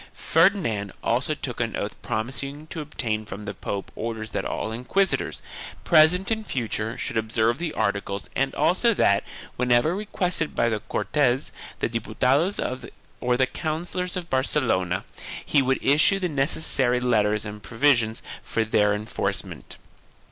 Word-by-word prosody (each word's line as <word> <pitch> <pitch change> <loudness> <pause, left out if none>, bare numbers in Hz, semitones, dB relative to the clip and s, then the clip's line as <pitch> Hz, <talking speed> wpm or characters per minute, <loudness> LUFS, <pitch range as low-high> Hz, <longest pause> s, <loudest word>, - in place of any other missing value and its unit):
Ferdinand 160 - +2
also 130 +6 +1
took 125 -5 -5
an 115 -2 -1
oath 100 - -3
promising 135 +6 -3
to 160 0 -6
obtain 115 -7 -2
from 105 -1 -8
the 105 0 -5
pope 100 +1 -5
orders 110 -1 -4
that - - -2
all 110 - -2
inquisitors, 125 +12 0 0.4
present 175 +5 +5
and 220 0 0
future, 115 -1 -2
should 125 - -3
observe 110 +2 +1
the 170 -2 -2
articles 100 0 -1
and 135 0 0
also 210 +6 +3
that, 100 - +3 0.3
whenever 125 +6 +3
requested 180 -5 -1
by 115 - +3
the 110 -2 -1
Cortes, 135 +3 0 0.3
the - - +2
Diputados 130 - +1 0.6
or 125 0 +1
the 130 - +4
councillors 175 +6 -3
of 175 -2 -5
Barcelona, 120 - +1 0.4
he 145 - +4
would 130 0 +2
issue 150 +8 +5
the 185 -2 0
necessary 135 -3 +2
letters 105 -4 +2
arid 105 0 -7
provisions 120 -2 +2 0.2
for 115 - -1
their 105 -1 +3
enforce 105 +2 -1
ment. - - -7
125 Hz, 145 wpm, -25 LUFS, 110-155 Hz, 0.6 s, present